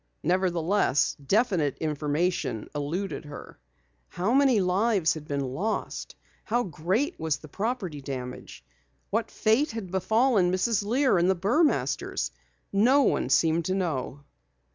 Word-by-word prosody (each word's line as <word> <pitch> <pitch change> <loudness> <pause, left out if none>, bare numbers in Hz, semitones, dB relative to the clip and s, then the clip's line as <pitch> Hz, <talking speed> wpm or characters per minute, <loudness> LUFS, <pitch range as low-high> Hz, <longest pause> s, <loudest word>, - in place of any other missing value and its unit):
Nevertheless, 175 -2 +1
definite 185 - +1
information 150 - -1
eluded 155 +3 -3
her. 145 - -10 0.5
How 190 - -1
many 270 -4 +4
lives 190 -1 +2
had 150 -1 -9
been 140 -3 -2
lost? 210 +10 -3 0.3
How 240 +2 0
great 190 - -1
was 160 -2 0
the 155 - -13
property 195 - -3
damage? 125 - -7 0.5
What - - 0
fate 230 +8 +2
had 210 -6 -6
befallen 215 0 +2
Mrs. 195 +3 +1
Lear 245 -1 +2
and 175 +2 +3
the 190 - +3
Burmasters? 190 - 0 0.4
No 250 +8 +5
one - - +1
seemed 165 0 +2
to 185 - 0
know. 145 -6 -3
180 Hz, 125 wpm, -27 LUFS, 150-220 Hz, 0.5 s, No